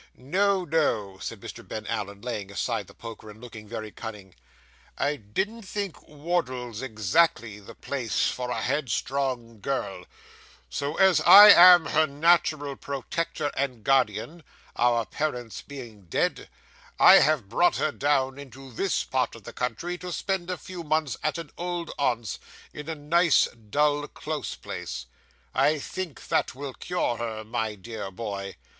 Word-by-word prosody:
'No, 190 +7 +1
no,' 110 - 0
said - - -6
Mr. - - -8
Ben 110 -1 -6
Allen, 100 0 -4
laying 105 -5 -4
aside 100 - -2
the - - -16
poker, 115 -2 -9
and 105 +1 -12
looking 115 -3 -10
very 110 +1 -6
cunning; 100 -5 -9 0.6
'I 145 +1 0
didn't 190 - -3
think 200 -3 -5
Wardle's 130 -7 -3
exactly 110 - +1
the 100 - -13
place 130 -6 -1
for 125 -1 -4
a - - -2
headstrong 130 -4 -2
girl; 100 -9 -3 0.7
so, 145 - -2
as 190 -4 +5
I 205 +6 +11
am 175 -2 +9
her 155 0 +2
natural 150 -1 +2
protector 145 +2 -3
and 130 -5 -2
guardian, 135 +5 +1 0.3
our 120 -1 +2
parents 125 -6 -4
being 120 -8 -10
dead, 85 - -1 0.5
I - - +9
have 150 -9 +3
brought 175 - +3
her 155 - 0
down 140 -2 0
into 135 -1 -11
this 185 +11 0
part 130 -2 -1
of 115 - -13
the - - -9
country 170 +9 -3
to 180 0 -6
spend 185 0 -2
a 180 - -2
few 185 -3 -8
months 155 -3 0
at 155 - -1
an 165 -3 -7
old 175 -1 -3
aunt's, 120 -6 -1 0.3
in 150 +1 -8
a 160 - -2
nice, 160 +2 +3
dull, 145 +7 0
close 150 -2 -5
place. 90 -10 -6 0.5
I 155 +1 +3
think 170 +2 -6
that - - +1
will 140 0 -6
cure 175 -9 -2
her, 110 -2 -4
my 110 -1 -3
boy. 100 -1 -6
135 Hz, 150 wpm, -26 LUFS, 110-160 Hz, 0.7 s, I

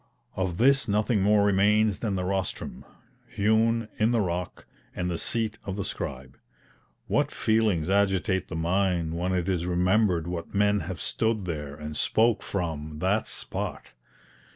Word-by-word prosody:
Of 95 -2 -2
this 135 +2 +4
nothing 105 +1 +1
more 100 +1 +4
remains 105 +1 +3
than 105 -4 -1
the 90 - -1
rostrum, 95 0 -3 0.4
hewn 110 +2 +1
in 110 +1 +3
the 120 -1 +2
rock, 90 -2 -3 0.3
and 90 0 -2
the 85 - -2
seat 115 -2 -1
of 95 - -4
the 100 - -3
scribe. 65 -1 -6 0.7
What - - +1
feelings 110 -8 +1
agitate 95 -1 +1
the - - -6
mind 85 -1 0
when 90 +2 -1
it 90 -1 0
is 90 -2 -1
remembered 90 0 +2
what 85 +2 -5
men 105 0 +3
have 90 0 -5
stood 110 -3 0
there 75 -4 -4
and 75 0 -7
spoke 110 +8 +2
from 80 -5 -4
that 95 +7 0
spot! - - -4
95 Hz, 155 wpm, -27 LUFS, 85-105 Hz, 0.7 s, this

